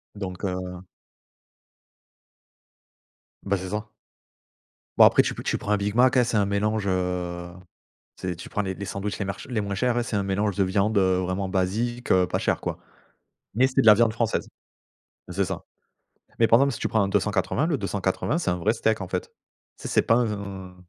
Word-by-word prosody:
Donc 95 -2 -6
heu 90 -1 -4 2.6
Ben, 100 0 0
c'est 95 0 -6
ça. 105 +2 -4 1.1
Bon - - +9
après - - +6
tu - - -2
pe - - -7
tu - - -1
prends 105 - -4
un 105 - +4
big 100 +1 -2
mac, 130 +2 +4
hein, 125 - +6
c'est 120 - -2
un 100 - +3
mélange, 100 +1 0
heu, 90 -1 -2 0.7
tu 95 - -5
sais, 90 - -2
tu 85 - -9
prends - - -2
les 95 -1 -3
les 100 - -6
sandwichs 100 +2 -4
les - - -2
merch 95 -1 -6
les 120 -4 -1
moins 100 -1 -3
chers, 120 +3 +1
c'est 110 - -3
un 100 - +1
mélange 100 +1 -1
de 100 - +3
viande, 100 +3 +1
heu, 95 -1 +3
vraiment 95 +1 -2
basique, 110 +6 -1
heu, 90 -1 +4
pas - - -1
chère, - - 0
quoi, - - -4 0.8
mais 125 +4 +4
c'est 135 +1 +1
de 130 - 0
la 105 - +10
viande 115 +1 +3
française, 115 -1 -1 0.8
c'est 95 +2 0
ça, - - -5 0.8
mais 115 - +5
par 115 - +6
exemple, 140 +1 +3
si 110 - -6
tu - - -1
prends 110 - +2
un 100 - 0
280, 105 - 0
le 165 -3 +1
280 100 - -1
c'est 170 - -1
un 90 - 0
vrai 100 +5 +1
steak, 110 -1 0
en 90 - -6
fait. 90 -1 -2 0.5
Tu - - -15
sais, - - -4
c'est - - +3
pas 115 - +3
un 100 -4 -5
100 Hz, 205 wpm, -25 LUFS, 95-110 Hz, 2.6 s, la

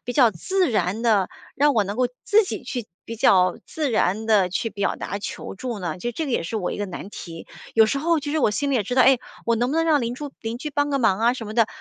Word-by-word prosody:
比 245 - -3
较 245 -3 +5
自 360 - 0
然 210 -1 0
地 215 -5 +2 0.2
让 290 +1 +3
我 215 - +3
能 200 +3 -5
够 250 -1 +2 0.2
自 430 +1 +4
己 - - -5
去 245 -4 -5 0.2
比 230 - -7
较 185 -4 +4
自 300 -5 -2
然 215 0 +1
地 205 -5 +4
去 225 +5 -2
表 200 -1 -1
达 200 - -4
求 200 - -6
助 235 +1 -5
呢？ 170 -1 -4
就 240 +6 -3
这 320 - -3
个 265 - -3
也 - - +1
是 220 +7 -4
我 185 - -2
一 - - -5
个 205 - -2
难 190 +2 -8
题。 165 -4 -9 0.3
有 220 -1 +7
时 275 +5 -1
候 325 +1 +1
其 290 - -4
实 315 - +1
我 245 - +3
心 280 +6 -1
里 - - +1
也 215 - +1
知 245 - -3
道， 255 - +6
诶， 260 -2 +5 0.3
我 230 -1 +2
能 245 +3 0
不 315 - -1
能 330 - +2
让 310 -3 +3
邻 240 0 -2
住 285 0 -7
邻 225 0 -4
居 300 +2 -5
帮 290 +1 0
个 275 - +1
忙 205 -5 +2
啊 235 +2 +4
什 225 -4 -7
么 215 - -7
的， 230 -2 +4
235 Hz, 310 characters per minute, -23 LUFS, 205-280 Hz, 0.3 s, 有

